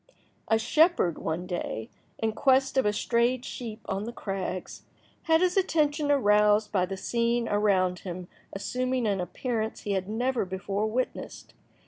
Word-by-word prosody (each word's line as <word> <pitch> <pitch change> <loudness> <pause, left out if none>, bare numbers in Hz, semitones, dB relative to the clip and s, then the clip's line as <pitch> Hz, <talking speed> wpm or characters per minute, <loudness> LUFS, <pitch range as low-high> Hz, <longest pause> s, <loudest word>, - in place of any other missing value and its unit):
A 225 - +4
shepherd 305 - +3
one 165 +3 -3
day, 175 - -4 0.3
in 225 0 0
quest 265 +3 +2
of 265 -5 +3
a - - +3
strayed 235 +4 +1
sheep 225 -3 -6
on 195 +1 -3
the 235 - -4
crags, 195 -5 -5 0.4
had 325 0 +4
his 365 -1 +2
attention 305 -5 +1
aroused 210 -5 +4
by 185 -3 +1
the 195 +1 -5
scene 235 +3 0
around 190 -4 +2
him 180 -1 -7 0.2
assuming 255 +4 -1
an 200 -3 +1
appearance 220 +5 -3
he 205 - -3
had 190 0 -1
never 245 +3 0
before 195 +3 -2
witnessed. 250 +4 -4
220 Hz, 150 wpm, -28 LUFS, 195-255 Hz, 0.4 s, A